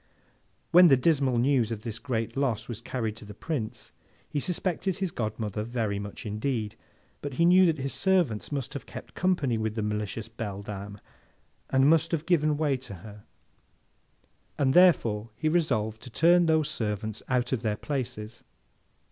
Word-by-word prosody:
When 180 +1 +9
the 135 -4 +6
dismal 135 -3 +2
news 125 -2 +2
of 110 -1 -5
his 115 -1 -5
great 115 -4 -3
loss 125 -5 -1
was 115 -2 -6
carried 115 -3 -3
to - - -10
the 105 0 -10
Prince, 115 -7 -5 0.4
he 145 - -2
suspected 180 +2 -2
his 190 -3 -2
godmother 110 -3 -3
very 110 -3 -2
much 100 +2 -7
indeed; 110 0 -2 0.5
but, 145 -3 -5
he 170 - +3
knew 180 +1 +6
that 160 -2 +1
his 135 0 -3
servants 175 - +1
must 140 -1 -3
have 140 - -7
kept - - -9
company 155 -11 +1
with 110 0 -2
the 110 - -1
malicious 105 +1 -3
beldame, 100 -2 -6 0.7
and 135 +1 +4
must 165 +1 +4
have 160 -1 -1
given 155 -4 +2
way 145 -3 +1
to 125 -6 -8
her, 105 -1 -12 1.3
and 135 -2 +2
therefore 115 - +4
he 155 +8 -2
resolved 120 -10 0
to 125 - -10
turn 170 +7 +4
those 160 -2 +3
servants 110 -6 -3
out 125 0 +1
of 125 - 0
their 110 -3 -1
places. 120 -5 -5
125 Hz, 165 wpm, -28 LUFS, 110-155 Hz, 1.3 s, When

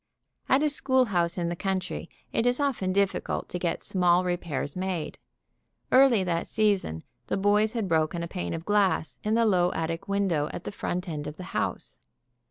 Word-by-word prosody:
At 270 +3 +4
a 305 - +3
schoolhouse 245 - +1
in 170 -1 -1
the 175 - -2
country 185 -2 -3 0.2
it 230 - +1
is 245 +2 +3
often 260 -10 0
difficult 200 0 0
to 180 - -4
get 170 -1 -2
small 180 -1 +3
repairs 170 -6 -2
made. 185 -3 -3 0.7
Early 255 -6 +6
that 170 -2 -1
season 200 - 0 0.2
the - - -1
boys 210 +2 +3
had 225 -5 -1
broken 165 0 +1
a - - -3
pane 180 -1 -4
of 165 0 -7
glass 200 -6 +1
in 215 +1 +1
the 230 0 +3
low 180 -4 +3
attic 165 +1 -3
window 195 -7 0
at 175 - -7
the - - -5
front 180 -2 -3
end 150 -3 -4
of 150 +1 -7
the 185 - -7
house. 60 0 -2
185 Hz, 180 wpm, -27 LUFS, 170-210 Hz, 0.7 s, Early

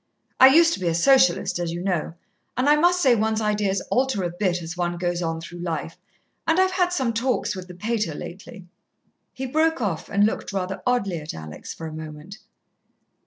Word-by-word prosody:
I 260 - +10
used 330 +5 +6
to - - -4
be 180 - -2
a 165 - +1
Socialist, 230 -3 +3
as 170 -1 -2
you 170 - -4
know, 175 -4 -2 0.4
but 255 +3 0
I 295 - +6
must 355 +3 +3
say 260 -3 +6
one's 220 -1 +1
ideas 210 -3 0
alter 255 -6 +1
a 175 - -2
bit 175 -1 -1
as 165 +2 -6
one 175 -1 -2
goes 175 0 -1
on 165 -1 -2
through 170 +1 -9
life, 165 -1 -4 0.5
and 325 +2 +3
I've 375 0 +3
had 360 -1 +1
some 260 -9 0
talks 230 -3 0
with 185 -1 -8
the 180 - -11
pater 210 -4 -2
lately." 190 +4 -9 0.7
He 265 - -6
broke 315 +4 +1
off, 190 -9 -3
and 200 +1 +3
looked 215 - -2
rather 190 -1 -3
oddly 200 -9 0
at 150 +1 -7
Alex 80 -1 -8
for 165 - -8
a 160 - -6
moment. 155 +5 -9
195 Hz, 205 wpm, -24 LUFS, 175-255 Hz, 0.7 s, I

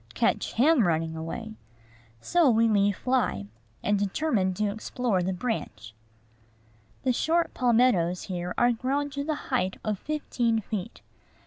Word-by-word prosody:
Catch - - 0
him 255 - +4
running 160 -1 0
away! 220 +8 -6 0.6
So 340 - +3
we 230 -1 +4
leave 205 -2 +3
Fly, 250 - 0 0.4
and 205 -1 +2
determine 205 -1 0
to 210 +1 0
explore 220 -1 -1
the 185 +2 -1
branch. 115 - -4 1.1
The 255 -2 +2
short 330 +6 +1
palmettoes 230 -8 +2
here 180 -2 -4
are 240 0 +4
grown 275 +5 -1
to 280 +1 -3
the 310 +1 -1 0.2
height 185 +1 0
of 210 -3 -2
fifteen 245 -6 -1
feet. 215 0 -5
220 Hz, 135 wpm, -27 LUFS, 185-255 Hz, 1.1 s, him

